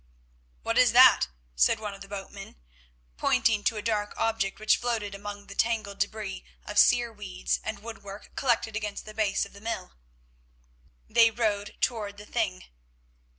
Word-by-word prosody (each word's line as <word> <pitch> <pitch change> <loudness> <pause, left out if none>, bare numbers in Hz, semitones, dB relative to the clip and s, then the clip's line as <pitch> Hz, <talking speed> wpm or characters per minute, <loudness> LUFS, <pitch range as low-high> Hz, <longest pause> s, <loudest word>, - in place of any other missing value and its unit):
"What - - +1
is - - +5
that?" - - +8 0.3
said 60 - +3
one 210 -2 -5
of 195 - -12
the 195 - -9
boatmen, 195 0 -8 0.6
pointing 210 - +2
to 225 - +1
a 210 - -4
dark 210 -2 -1
object 220 -3 0
which 215 - +4
floated 225 -4 -2
among 205 0 -7
the 200 - -10
tangled 215 -2 -1
debris 200 -1 -3 0.2
of 210 0 +1
sere 240 -1 +4
weeds - - -3
and - - -4
woodwork 205 -3 -9
collected 235 -4 0
against 210 -2 -4
the 215 - -9
base 210 -2 +1
of - - -15
the 200 - -13
mill. 225 - -4 1.1
They 230 -1 +5
rowed 215 -3 -1
to 215 -4 -1
the 205 +1 -12
thing. 210 -5 -2
210 Hz, 160 wpm, -28 LUFS, 200-225 Hz, 1.1 s, that